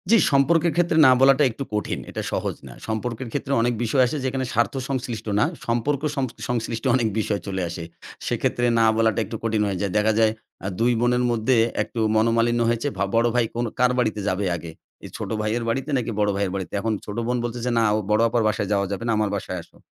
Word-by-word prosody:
জ্বি, 230 Hz, -, +7 dB
সম্পর্কের 160 Hz, +4 st, +3 dB
ক্ষেত্রে 170 Hz, -2 st, +2 dB
না -, -, +7 dB
বলাটা 135 Hz, +2 st, +6 dB
একটু 125 Hz, +5 st, -5 dB
কঠিন। 105 Hz, -1 st, -2 dB
এটা -, -, -4 dB
সহজ -, -, -2 dB
না। -, -, -10 dB
সম্পর্কের 115 Hz, +3 st, -3 dB
ক্ষেত্রে 135 Hz, -, -3 dB
অনেক 120 Hz, +1 st, +1 dB
বিষয় 130 Hz, +3 st, +3 dB
আসে 150 Hz, -, -3 dB
যেখানে 130 Hz, 0 st, -1 dB
স্বার্থ 120 Hz, +1 st, +1 dB
সংশ্লিষ্ট 120 Hz, -5 st, -4 dB
না। 125 Hz, -, +4 dB, 0.2 s
সম্পর্ক 120 Hz, +4 st, 0 dB
সং 135 Hz, -, 0 dB, 0.3 s
সংশ্লিষ্ট 115 Hz, -1 st, -2 dB
অনেক 120 Hz, -3 st, +2 dB
বিষয় 105 Hz, -1 st, -1 dB
চলে 95 Hz, -1 st, -2 dB
আসে। 85 Hz, 0 st, -6 dB, 0.4 s
সেক্ষেত্রে 120 Hz, -, 0 dB
না 115 Hz, -, +5 dB
বলাটা 110 Hz, -2 st, +2 dB
একটু -, -, -7 dB
কঠিন 110 Hz, -2 st, +1 dB
হয়ে 95 Hz, -2 st, -2 dB
যায়। 100 Hz, -2 st, -1 dB
দেখা 110 Hz, +1 st, +3 dB
যায় 110 Hz, -1 st, +4 dB, 0.3 s
এ্যাঁ 95 Hz, -, -3 dB
২ 120 Hz, +2 st, +3 dB
বোনের 125 Hz, +1 st, +2 dB
মধ্যে 120 Hz, +2 st, +2 dB, 0.3 s
একটু 115 Hz, -, -7 dB, 0.2 s
মনোমালিন্য 115 Hz, +2 st, +2 dB
হয়েছে। 120 Hz, +4 st, 0 dB
ভা -, -, +1 dB
বড় 115 Hz, +1 st, +4 dB
ভাই 120 Hz, -1 st, +3 dB
কোন 120 Hz, +1 st, 0 dB
কার 125 Hz, 0 st, +4 dB
বাড়িতে 110 Hz, -3 st, 0 dB
যাবে 100 Hz, +1 st, 0 dB
আগে? 85 Hz, -1 st, -7 dB, 0.3 s
এই -, -, -8 dB
ছোট -, -, -5 dB
ভাইয়ের 110 Hz, +3 st, -1 dB
বাড়িতে 135 Hz, +5 st, -2 dB
নাকি 120 Hz, -2 st, -2 dB
বড় 105 Hz, 0 st, +2 dB
ভাইয়ের 100 Hz, -2 st, -1 dB
বাড়িতে। 95 Hz, -2 st, -5 dB
এখন 110 Hz, +2 st, -1 dB
ছোট 105 Hz, +1 st, -6 dB
বোন 125 Hz, 0 st, 0 dB
বলতেছে, 120 Hz, +1 st, -3 dB
"না 115 Hz, -, +4 dB, 0.3 s
বড় 105 Hz, +1 st, +4 dB
আপার 120 Hz, 0 st, +1 dB
বাসায় 105 Hz, -1 st, -1 dB
যাওয়া 100 Hz, -1 st, +1 dB
যাবে 100 Hz, +3 st, -3 dB
না। -, -, +2 dB
আমার 105 Hz, -1 st, +1 dB
বাসায় 95 Hz, -2 st, -4 dB
আসো।" -, -, -20 dB
115 Hz, 215 wpm, -23 LUFS, 105-125 Hz, 0.4 s, জ্বি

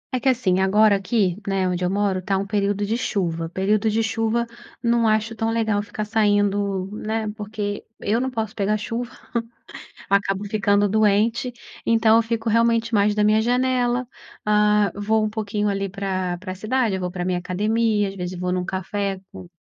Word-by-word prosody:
É -, -, 0 dB
que, 265 Hz, +2 st, +2 dB
assim, 190 Hz, -8 st, +2 dB
agora 205 Hz, +2 st, +4 dB
aqui, 195 Hz, -1 st, 0 dB
né, 195 Hz, -1 st, +1 dB
onde 180 Hz, 0 st, -1 dB
eu 180 Hz, -, +1 dB
moro 195 Hz, -1 st, 0 dB
tá 195 Hz, +1 st, 0 dB
um 195 Hz, -, -2 dB
período 205 Hz, 0 st, 0 dB
de 220 Hz, +3 st, -1 dB
chuva. 165 Hz, -7 st, -2 dB
Período 200 Hz, +4 st, +1 dB
de 225 Hz, +1 st, +1 dB
chuva 225 Hz, +1 st, 0 dB, 0.4 s
não 235 Hz, -1 st, +3 dB
acho 220 Hz, +1 st, +1 dB
tão 225 Hz, 0 st, -1 dB
legal 220 Hz, -3 st, +1 dB
ficar 210 Hz, +1 st, -5 dB
saindo, 205 Hz, -3 st, +1 dB
né, 220 Hz, 0 st, -2 dB
porque 210 Hz, -1 st, -4 dB, 0.2 s
eu 225 Hz, +4 st, 0 dB
não 260 Hz, -, -1 dB
posso 220 Hz, -4 st, -3 dB
pegar 210 Hz, +1 st, 0 dB
chuva, 230 Hz, +3 st, -4 dB, 1.0 s
acabo 200 Hz, 0 st, +1 dB
ficando 205 Hz, -1 st, +2 dB
doente 220 Hz, +4 st, +2 dB, 0.3 s
então 225 Hz, -1 st, +4 dB
eu 230 Hz, -, +6 dB
fico 225 Hz, 0 st, -2 dB
realmente 230 Hz, +1 st, +2 dB
mais 205 Hz, 0 st, +3 dB
da 210 Hz, -, 0 dB
minha 215 Hz, +1 st, +4 dB
janela, 250 Hz, 0 st, +1 dB, 0.4 s
ah, 210 Hz, -1 st, +3 dB
vou 215 Hz, +2 st, +1 dB
um 215 Hz, -, 0 dB
pouquinho 210 Hz, -1 st, -2 dB
ali 195 Hz, 0 st, -2 dB
pra 185 Hz, -2 st, -2 dB
pra 185 Hz, 0 st, -6 dB
cidade, 220 Hz, +1 st, 0 dB
eu -, -, -3 dB
vou 180 Hz, -, -2 dB
pra 180 Hz, -1 st, -4 dB
minha 180 Hz, -1 st, 0 dB
academia, 210 Hz, +3 st, +1 dB
às 195 Hz, -, -9 dB
vezes 180 Hz, -1 st, -5 dB
vou 180 Hz, 0 st, -1 dB
num 180 Hz, 0 st, -1 dB
café 195 Hz, +1 st, -3 dB
com 185 Hz, -2 st, -10 dB
210 Hz, 185 wpm, -23 LUFS, 195-225 Hz, 1.0 s, eu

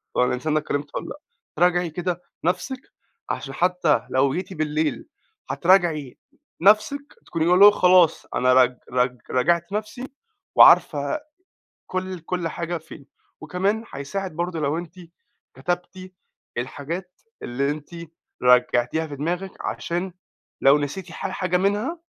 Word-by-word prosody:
طب -, -, +3 dB
الإنسان 125 Hz, +5 st, 0 dB
ده 155 Hz, -, +3 dB
كلمته 145 Hz, -1 st, -4 dB
ووالّا -, -, -9 dB
لأ، 295 Hz, -, -8 dB, 0.4 s
تراجعي 175 Hz, -1 st, +2 dB
كده 175 Hz, +2 st, -3 dB, 0.2 s
نفسِك 185 Hz, -, -1 dB, 0.5 s
عشان -, -, -4 dB
حتّى 180 Hz, -4 st, +1 dB
لو 135 Hz, +1 st, +2 dB
جيتِ 185 Hz, +1 st, -4 dB
بالليل 155 Hz, -1 st, -2 dB, 0.4 s
هتراجعي 170 Hz, -7 st, +2 dB, 0.4 s
نفسِك 215 Hz, +9 st, +3 dB
تكوني 165 Hz, +2 st, +1 dB
اللي 190 Hz, +3 st, +8 dB
هو 205 Hz, -, +10 dB
خلاص 180 Hz, -4 st, +4 dB
أنا 130 Hz, 0 st, +3 dB
رج 125 Hz, -1 st, +4 dB
رج 125 Hz, 0 st, +1 dB
راجعت 170 Hz, +8 st, +1 dB
نفسي 220 Hz, +5 st, -4 dB, 0.5 s
وعارفة 305 Hz, -, +6 dB, 0.7 s
كل 185 Hz, 0 st, -4 dB
كل 170 Hz, 0 st, -3 dB
حاجة 170 Hz, +1 st, -4 dB
فين، 160 Hz, -3 st, -13 dB, 0.3 s
وكمان 195 Hz, +8 st, -1 dB
هيساعد 155 Hz, +5 st, -5 dB
برضه 175 Hz, -1 st, -2 dB
لو 150 Hz, +2 st, 0 dB
أنتِ 170 Hz, 0 st, -8 dB, 0.6 s
كتبتِ 185 Hz, +1 st, -4 dB, 0.5 s
الحاجات 165 Hz, +8 st, -6 dB, 0.2 s
اللي 140 Hz, +4 st, -1 dB
أنتِ 150 Hz, 0 st, -6 dB, 0.5 s
راجعتيها 125 Hz, +4 st, +3 dB
في 145 Hz, -2 st, -8 dB
دماغك 175 Hz, +6 st, -3 dB
عشان 175 Hz, +2 st, -3 dB, 0.5 s
لو 135 Hz, +2 st, +6 dB
نسيتِ 165 Hz, +5 st, -5 dB
ح -, -, -4 dB
حاجة 180 Hz, -1 st, -1 dB
منها 205 Hz, -, 0 dB
170 Hz, 130 wpm, -23 LUFS, 145-185 Hz, 0.7 s, هو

